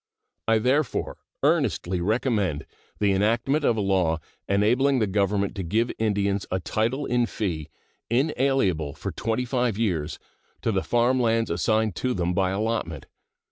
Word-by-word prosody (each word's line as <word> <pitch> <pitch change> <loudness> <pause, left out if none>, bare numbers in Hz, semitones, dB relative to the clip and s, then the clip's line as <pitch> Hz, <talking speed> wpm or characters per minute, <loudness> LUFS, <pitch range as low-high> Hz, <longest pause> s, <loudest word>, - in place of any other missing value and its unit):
I 115 0 +4
therefore 130 +3 0 0.2
earnestly 90 0 +1
recommend 105 - 0 0.3
the 100 -1 +2
enactment 115 +9 +1
of 115 -5 +2
a - - +1
law 95 -5 +2 0.3
enabling 120 +8 +3
the 110 - +2
Government 100 0 0
to 95 - -2
give 110 +8 0
Indians 100 -2 0
a 95 - -1
title 115 +9 -1
in 120 -1 +1
fee, 80 -10 -3 0.4
inalienable 125 - +1
for - - -5
twenty 115 +3 -2
five 125 -4 0
years, 90 -10 -1 0.5
to 115 - +1
the 95 -2 +1
farm 120 +4 +2
lands 115 -2 +1
assigned 110 +4 +1
to 125 -1 -1
them 90 -1 0
by 95 0 +1
allotment. 95 -7 -2
110 Hz, 145 wpm, -25 LUFS, 95-120 Hz, 0.5 s, I